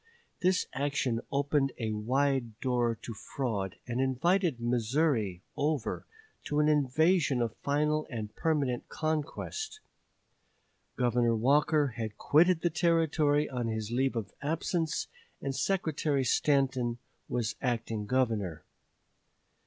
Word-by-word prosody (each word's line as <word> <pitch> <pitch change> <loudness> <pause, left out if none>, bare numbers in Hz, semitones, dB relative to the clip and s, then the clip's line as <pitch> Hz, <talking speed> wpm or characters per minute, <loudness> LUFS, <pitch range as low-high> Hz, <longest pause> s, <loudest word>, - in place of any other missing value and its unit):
This 185 +1 +3
action 135 -4 0
opened 140 -1 +1
a 110 -2 -2
wide 120 +1 0
door 120 -3 +1
to 115 - -5
fraud, 105 -4 -3
and 125 +1 -1
invited 155 +3 +1
Missouri 120 - 0
over 145 -4 -1 0.4
to 150 - 0
an 150 - +4
invasion 150 0 +3
of 115 -2 -1
final 150 +2 0
and 110 -4 -5
permanent 145 -6 0
conquest. 160 - -3 1.2
Governor 120 -2 +2
Walker 145 +5 +3
had 110 -2 -4
quitted 165 +3 +4
the 175 - +1
Territory 160 -3 +2
on 125 -3 -3
his 110 -1 -3
leave 130 +1 +1
of 105 -4 -4
absence, 160 +2 -1 0.3
and 135 -1 -3
Secretary 155 -3 0
Stanton 130 -2 +2 0.3
was 115 -3 -1
acting 115 -4 -2
Governor. 110 -10 0
135 Hz, 115 wpm, -30 LUFS, 115-150 Hz, 1.2 s, an